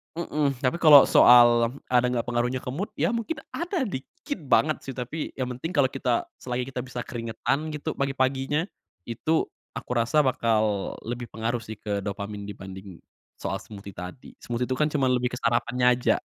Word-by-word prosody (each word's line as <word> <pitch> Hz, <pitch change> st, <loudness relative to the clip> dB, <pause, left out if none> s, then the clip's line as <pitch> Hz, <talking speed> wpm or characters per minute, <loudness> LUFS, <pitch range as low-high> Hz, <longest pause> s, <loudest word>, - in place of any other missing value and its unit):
mhm, 150 Hz, -4 st, 0 dB
tapi 130 Hz, +7 st, +1 dB
kalau 150 Hz, -4 st, +9 dB
soal 120 Hz, 0 st, +7 dB, 0.2 s
ada 125 Hz, 0 st, +4 dB
nggak 125 Hz, -2 st, 0 dB
pengaruhnya 120 Hz, +1 st, 0 dB
ke -, -, -5 dB
mood, 190 Hz, -, -3 dB
ya -, -, +1 dB
mungkin 235 Hz, +5 st, -3 dB
ada 345 Hz, -2 st, -2 dB
dikit 195 Hz, -, -6 dB
banget 155 Hz, +3 st, +3 dB
sih 135 Hz, -, -5 dB
tapi 130 Hz, +5 st, -5 dB
yang 130 Hz, -1 st, -2 dB
penting 165 Hz, +7 st, -4 dB
kalau 135 Hz, -3 st, +4 dB
kita 125 Hz, -3 st, 0 dB, 0.2 s
selagi 125 Hz, +1 st, -3 dB
kita 130 Hz, -, -4 dB
bisa 125 Hz, -1 st, -5 dB
keringetan, 120 Hz, +6 st, -2 dB
gitu, 150 Hz, +1 st, -3 dB
pagi-paginya, 135 Hz, +2 st, 0 dB, 0.5 s
itu 160 Hz, +7 st, +1 dB, 0.3 s
aku -, -, -8 dB
rasa 120 Hz, +6 st, +3 dB
bakal 110 Hz, -6 st, +1 dB
lebih 120 Hz, +1 st, -4 dB
pengaruh 115 Hz, +2 st, -1 dB
sih 110 Hz, -, -7 dB
ke 105 Hz, -1 st, -2 dB
dopamin 100 Hz, 0 st, -5 dB
dibanding 95 Hz, -2 st, -9 dB, 0.4 s
soal -, -, -2 dB
smoothie 100 Hz, -1 st, -10 dB
tadi. 90 Hz, +7 st, -8 dB
Smoothie 120 Hz, +1 st, -2 dB
itu 130 Hz, -, 0 dB
kan 150 Hz, -, +3 dB
cuman 135 Hz, -3 st, +1 dB
lebih 125 Hz, 0 st, -2 dB
ke -, -, -3 dB
sarapannya 120 Hz, +1 st, +1 dB
aja. 125 Hz, 0 st, +1 dB
125 Hz, 170 wpm, -26 LUFS, 115-145 Hz, 0.5 s, kalau